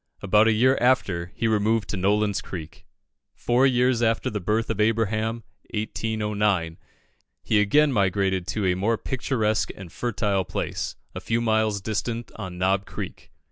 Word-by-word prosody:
About 105 +3 +4
a - - +5
year 130 +5 +3
after, 95 -9 +1
he 115 - 0
removed 110 -1 +1
to - - -2
Nolin's 100 +2 +1
Creek. 80 -4 -9 0.5
Four 125 +3 +3
years 125 -1 +2
after 115 -1 +1
the 105 - -2
birth 110 +5 0
of - - -4
Abraham 110 +1 0 0.3
(1809), 105 -5 -1 0.6
he 105 -1 +3
again 145 +7 +3
migrated 95 -3 +1
to 105 -3 -1
a 90 - +3
more 110 +5 +1
picturesque 110 -8 -1
and 95 -4 -10
fertile 105 -5 -1
place, - - -4 0.2
a - - -6
few 115 +1 0
miles 110 -3 +1
distant 115 +3 -3
on 95 -4 -7
Knob 95 +2 +1
Creek. - - -7
105 Hz, 150 wpm, -25 LUFS, 95-115 Hz, 0.6 s, a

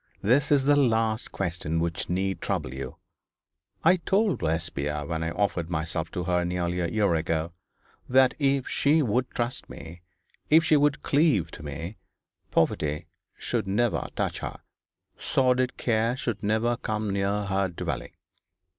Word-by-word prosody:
That 135 +8 +3
is 140 -2 +5
the 145 +1 +5
last 115 -5 +1
question 85 -3 -2
which 85 0 -2
need 95 +2 -1
trouble 65 - -2
you. 65 -1 -6 0.9
I 180 +3 +6
told 195 +3 +1
Lesbia 75 -3 -1
when 80 +1 -3
I 80 - -1
offered 85 -2 -1
myself 80 0 -2
to 90 - -2
her 90 0 +1
nearly 90 0 -1
a 85 - 0
year 100 +1 +1
ago, 80 0 -1 0.6
that 130 0 +5
if 140 -2 +1
she 150 +2 +3
would 125 +2 0
trust 120 +1 -3
me, 85 +2 -10 0.5
if 160 +2 +6
she 160 -1 +4
would 145 -1 +2
cleave 135 - +2
to - - -10
me, 80 +7 -6 0.5
poverty 75 0 0 0.3
should - - -2
never 115 +4 +1
touch - - -1
her, - - -6 0.6
sordid 125 -1 +1
care 115 +1 +1
should 120 -5 -3
never 110 +3 +1
come 105 -2 -2
near 100 +1 0
her 95 0 +1
dwelling. 90 - -5
100 Hz, 150 wpm, -27 LUFS, 85-125 Hz, 0.9 s, I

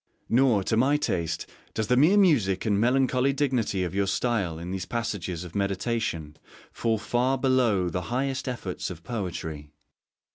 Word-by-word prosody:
Nor, 120 -5 +4
to 110 - 0
my 135 +6 +3
taste, 95 - -2 0.3
does 110 - 0
the 125 - +2
mere 155 +10 +5
music 120 - +3
and 105 -2 +2
melancholy 130 +2 +2
dignity 125 -9 0
of 90 -1 -3
your 100 0 +1
style 95 -4 0
in 85 +2 -6
these 95 -1 -4
passages 95 -7 -3
of 90 - -10
meditation 100 -6 -2 0.3
fall 115 -1 0
far 125 +5 0
below 125 -8 +2
the 90 +1 -2
highest 130 +2 -1
efforts 115 -8 -4
of 85 -2 -9
poetry. 85 -7 -5
110 Hz, 155 wpm, -26 LUFS, 90-130 Hz, 0.3 s, mere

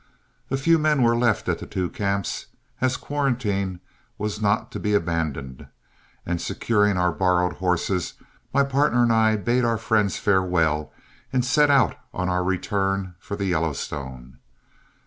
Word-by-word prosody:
A 135 - 0
few 165 +5 +3
men 150 -3 +2
were 115 0 +4
left 120 -2 +1
at - - 0
the - - -8
two 90 -1 -2
camps, 100 -1 -2 0.3
as 130 0 +1
quarantine 105 -10 -1 0.4
was 105 0 -3
not 105 +1 +1
to - - -5
be 105 -1 0
abandoned, 80 -8 -2 0.6
and 85 -1 -2
securing 105 -4 +1
our 90 0 +2
borrowed 90 0 +1
horses, 90 0 -1 0.4
my 140 - +3
partner 140 -2 +2
and 115 -1 +3
I 110 -1 +4
bade 120 +4 +1
our 115 -1 +1
friends 110 -3 +1
farewell 90 -6 +1 0.4
and 125 -2 +1
set 150 +3 +4
out 130 - +3 0.2
on 90 0 -1
our 90 0 +1
return 95 0 -1
for 100 - -6
the 100 -1 -3
Yellowstone. 70 -6 -3
100 Hz, 150 wpm, -24 LUFS, 90-120 Hz, 0.6 s, were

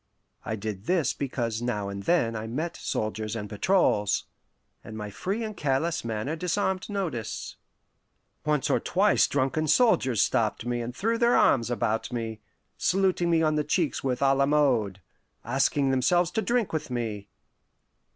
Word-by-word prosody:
I 110 - -3
did 105 -1 -5
this 175 -2 +1
because 120 -5 -3
now 105 -5 -2
and 100 0 -5
then 115 - +1
I 110 +1 -4
met 155 +9 -3
soldiers 110 0 -3
and 105 -2 -4
patrols, 105 - +2 0.6
and 110 -1 -8
my 105 -1 -6
free 195 - -3
and 215 -1 -5
careless 155 +3 0
manner 115 +6 -3
disarmed 185 +3 -1
notice. 170 - -4 0.9
Once 150 -2 +1
or - - +3
twice 200 +3 +3
drunken 145 +3 0
soldiers 140 - +3
stopped 110 +1 0
me 120 0 -1
and 120 +1 -5
threw 230 - 0
their 235 0 +4
arms 120 -3 +3
about 115 -1 -1
me, 115 -3 -4 0.4
saluting 185 -1 +2
me 165 -1 +3
on 155 -1 +2
the 150 - +1
cheeks 165 0 0
a 135 - -1 0.2
la 140 0 +2
mode, 125 -10 +2 0.4
asking 135 +2 +1
themselves 170 +7 +2
to 220 - 0
drink 235 -4 0
with 155 - -3
me. 110 -5 -3
135 Hz, 155 wpm, -27 LUFS, 110-170 Hz, 0.9 s, their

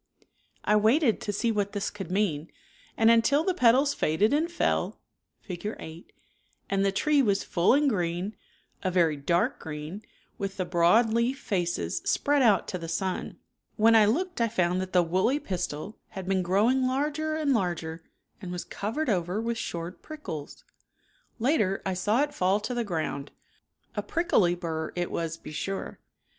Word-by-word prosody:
I 210 - +4
waited 225 +3 +3
to 205 - -2
see 225 +3 0
what 205 -2 -1
this 205 -1 -2
could 195 -4 -7
mean, 180 -6 -1 0.5
and 225 0 +6
until 230 +6 +4
,..M„..i - - -5
the 375 - +2
petals 270 -1 +4
faded 205 - +1
and 320 +4 +1
fell 345 - 0 0.4
(Fig. 200 +3 -5
8) 160 +2 -10 0.6
and 195 0 +2
the 195 - +2
tree 290 +8 +3
was 200 -6 +1
full 175 +8 +3
and 290 +1 +3
green, 180 -2 -1 0.5
a 185 - 0
very 170 -4 +3
dark 170 +5 0
green, 155 +5 -6 0.4
with 195 -1 -4
the 185 - -1
broad 180 +8 +4
leaf 235 +4 +1
faces 175 -8 -2
spread 290 0 +2
out 215 -7 +4
to 185 - -3
the 165 - -6
sun. 185 +3 -3 0.4
When 225 +1 +5
I 220 -2 +7
looked 345 - 0
I 230 - +4
found 180 -4 0
that 185 0 -5
the 180 -1 +4
woolly 190 - +1
pistil 180 - -4
had 190 -1 -8
been 190 -1 +2
growing 220 +9 +2
larger 300 +4 -1
and 300 -3 +1
larger 170 -6 -2 0.4
and 180 -3 -6
was 180 -1 -4
covered 250 +10 -3
over 180 -2 0
with 230 0 -2
short 170 -2 -5
prickles. 300 - -8 0.7
Later 225 -6 +1
I 190 - 0
saw 210 +8 +2
it 295 - -3
fall 190 +3 +2
to 250 - -3
the 240 -1 -1
ground, 160 -7 -3 0.6
A - - -2
prickly 215 - +2
bur 160 -2 -4
it 175 0 -2
was 165 -1 -3
be - - -10
sure. 195 +6 -4
200 Hz, 175 wpm, -27 LUFS, 175-240 Hz, 0.7 s, I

